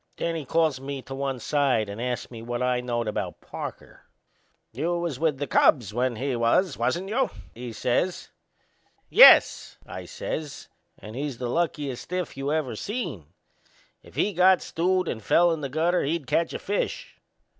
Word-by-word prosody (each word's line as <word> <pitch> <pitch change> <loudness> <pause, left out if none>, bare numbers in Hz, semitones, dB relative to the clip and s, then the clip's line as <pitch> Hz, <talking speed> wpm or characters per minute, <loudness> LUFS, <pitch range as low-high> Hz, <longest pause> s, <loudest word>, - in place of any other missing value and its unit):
Then 170 - -1
he 155 -3 -4
calls 155 -2 +1
me 135 -1 -5
to 135 - -8
one 135 -1 -3
side 130 -6 +1
and 100 +3 -6
ast 125 0 -3
me 115 -2 -8
what 120 +2 -3
I 125 -1 +1
knowed 120 -2 -2
about 105 - -3
Parker. - - -9 0.6
"You 165 +9 -1
was 170 -6 -3
with 155 -3 +1
the 145 - -2
Cubs 120 - +3
when 125 +1 0
he 130 +2 -2
was, 120 +9 +2
wasn't 130 +11 -1
you?" 255 +5 +1 0.2
he 120 0 -7
says. 125 +11 -1 0.8
"Yes," - - +7
I - - -8
says; 160 - -6 0.3
"and 110 +2 -10
he's 140 -2 -4
the 125 -1 -3
luckiest 150 -6 -1
stiff 180 -2 -4
you 135 +1 -3
ever 150 -7 -1
seen! 195 - -5 0.7
If - - -18
he 205 - +1
got 185 +1 +5
stewed 185 +1 0
and 110 - -3
fell 175 - +4
in 160 -2 -2
the 140 - -3
gutter 165 +6 +1
he'd 155 +1 -2
catch 165 +6 +1
a - - -2
fish." 205 - -3
140 Hz, 175 wpm, -26 LUFS, 125-170 Hz, 0.8 s, Yes